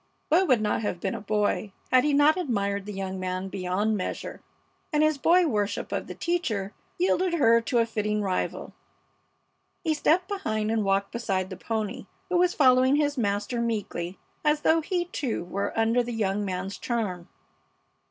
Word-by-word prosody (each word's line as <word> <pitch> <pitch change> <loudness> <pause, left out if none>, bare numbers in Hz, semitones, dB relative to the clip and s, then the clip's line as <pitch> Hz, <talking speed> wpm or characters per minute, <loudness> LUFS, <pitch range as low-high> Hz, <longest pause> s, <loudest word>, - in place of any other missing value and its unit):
Bud 360 +4 +4
would 250 -5 +4
not 210 0 0
have 195 -5 -2
been 190 - -2
a - - -5
boy 210 -1 0 0.2
had 255 -1 +6
he 300 - +2
not 290 +2 +5
admired 200 - -1
the - - -4
young 190 -1 -4
man 185 +1 -3
beyond 195 +3 -1
measure; 185 - -4 0.5
and 300 -1 +3
his 310 -2 +2
boy 350 +5 +5
worship 210 -8 -1
of - - -3
the - - -7
teacher 220 - -1 0.2
yielded 360 0 +2
her 230 -7 +5
to 240 +2 -1
a 230 - +4
fitting 210 -2 -1
rival. 185 -2 -2 1.1
He 320 -3 +1
stepped 335 +4 +2
behind 220 - -2
and 225 -1 +1
walked 195 0 +1
beside 195 -5 -2
the - - -4
pony, 215 0 -4 0.2
who 360 - +2
was 360 0 +3
following 260 -1 +5
his 290 -1 +1
master 210 +1 -1
meekly, 200 -6 -3 0.3
as 300 0 +2
though 325 +1 +3
he, 350 +1 -1
too, 270 - -3
were 195 +3 -3
under 225 +2 +3
the 240 0 -4
young 205 -2 0
man's 190 0 -4
charm. 200 -8 -3
225 Hz, 175 wpm, -26 LUFS, 200-295 Hz, 1.1 s, had